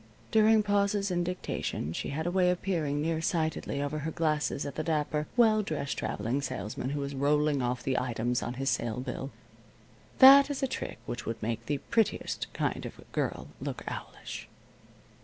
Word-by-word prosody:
During 220 0 +5
pauses 200 -1 +1
in 175 -1 +1
dictation 175 - -3
she - - -3
had 155 +3 -3
a 175 - 0
way 180 -1 +3
of 180 0 -1
peering 150 -6 0
near 160 0 0
sightedly, 160 -4 -1
over 145 +2 -2
her 150 +2 -3
glasses 155 -3 0
at 140 - -4
the - - -2
dapper, 150 -1 0
well 220 -3 +5
dressed 155 -7 -3
traveling 115 +7 -1
salesman 105 0 -4
who 145 +1 -2
was 140 0 -4
rolling 145 +1 +2
off 125 0 -1
the 130 -1 +1
items 120 0 -1
on 120 - -4
his 135 +2 0
sale 120 0 -1
bill. 130 +1 -4 0.9
That 275 +2 +10
is 280 -1 -3
a - - +3
trick - - -5
which 120 - -5
would 115 0 -3
make 115 +1 -3
the 145 - 0
prettiest 225 +8 -1
kind - - -2
of - - -11
a - - -13
girl - - -2
look - - -4
owlish. - - -6
150 Hz, 185 wpm, -30 LUFS, 135-180 Hz, 0.9 s, That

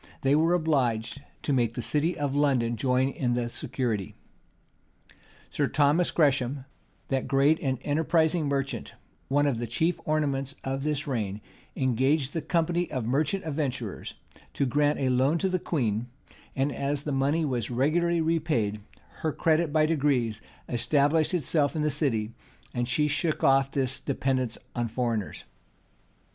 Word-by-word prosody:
they 135 +1 +3
were 165 +3 +3
obliged 135 -7 0 0.2
to 145 - 0
make 120 -3 +1
the - - -4
city 160 +6 0
of 145 -2 -1
London 130 -5 +2
join 130 +3 +1
in 125 -3 -1
the 120 -1 -1
security. 120 -5 -3 1.4
Sir - - +1
Thomas 150 +4 +3
Gresham, 135 -3 +1 0.4
that 135 -1 -1
great 140 +3 +3
and 130 -3 -1
enterprising 160 +1 +1
merchant, 140 -1 -3 0.3
one 145 +2 +2
of 135 -5 0
the 120 - -3
chief 160 +9 0
ornaments 140 -3 -1
of 135 0 -2
this 150 +1 -1
reign, 110 -8 -2 0.4
engaged 130 +2 +1
the 165 - -1
company 170 +2 0
of 130 -4 -3
merchant 150 - 0
adventurers 135 -8 -3 0.4
to 140 - +1
grant 145 +3 +2
a 135 -2 0
loan 130 +5 +3
to 190 +3 0
the 185 0 0
queen; 120 -9 -1 0.5
and 135 +2 +1
as 140 0 -2
the 150 - -3
money 140 +4 +1
was 125 -6 -2
regularly 165 +7 +1
repaid, 150 -11 0 0.4
her 160 - 0
credit 160 +1 +1
by 155 0 +3
degrees 135 -9 +1 0.3
established 145 +7 +2
itself 155 -2 +1
in 155 - 0
the 150 - +1
city, 120 -7 -1 0.4
and 120 -1 -1
she 150 +5 +2
shook 155 +2 0
off 135 0 +4
this 135 -2 -1
dependence 130 -3 -1 0.2
on 120 -1 0
foreigners. 115 -3 -2
140 Hz, 150 wpm, -27 LUFS, 125-155 Hz, 1.4 s, off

